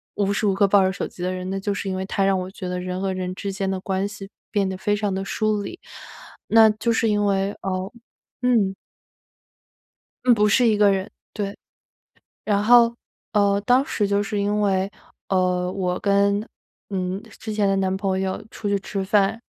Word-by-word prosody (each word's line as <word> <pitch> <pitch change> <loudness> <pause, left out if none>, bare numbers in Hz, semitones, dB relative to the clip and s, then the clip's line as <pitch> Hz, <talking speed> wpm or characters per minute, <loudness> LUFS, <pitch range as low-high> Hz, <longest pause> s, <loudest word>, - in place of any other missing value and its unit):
无 200 0 +1
时 210 - -1
无 195 - +3
刻 200 +1 +3
抱 195 0 +5
着 190 - +2
手 195 - -4
机 180 - -9
的 185 - 0
人。 185 0 -4
那 195 - -2
就 205 0 -1
是 200 - -4
因 190 - -2
为 190 0 -3
他 195 0 0
让 195 -1 +3
我 185 +1 -4
觉 185 -2 -7
得 180 0 -3
人 180 0 -4
和 190 -1 -1
人 185 0 -3
之 200 0 -4
间 195 0 -2
的 190 - -2
关 190 +1 -1
系 200 -1 -7 0.2
变 200 -2 +1
得 190 - -3
非 205 +2 0
常 205 -2 -1
地 195 - -2
疏 215 +1 0
离， 350 - -7 0.7
那 225 -1 +7
就 225 +2 -1
是 225 0 +2
因 205 -1 +2
为， 195 0 +1
呃 190 +3 -3 0.5
嗯。 225 -6 +2 1.5
嗯， 245 - +7
不 210 0 +3
是 235 +3 +4
一 215 -2 +3
个 205 -1 +5
人， 190 0 -1 0.2
对。 200 -1 -3 0.9
然 205 -1 +1
后 235 0 +6 0.4
呃， 200 -1 +3
当 250 +5 +3
时 210 -10 0
就 200 0 +1
是 205 0 -2
因 205 +1 0
为， 195 -1 +1 0.4
呃， 180 -1 +1
我 180 -2 -2
跟， 200 +1 +2 0.4
嗯， 190 0 -2 0.2
之 220 - -5
前 210 -1 +1
的 195 - +2
男 190 0 0
朋 190 -1 -1
友 190 +1 -2
出 205 - -4
去 200 - +2
吃 195 0 -4
饭， 205 +3 +2
200 Hz, 220 characters per minute, -23 LUFS, 190-210 Hz, 1.5 s, 那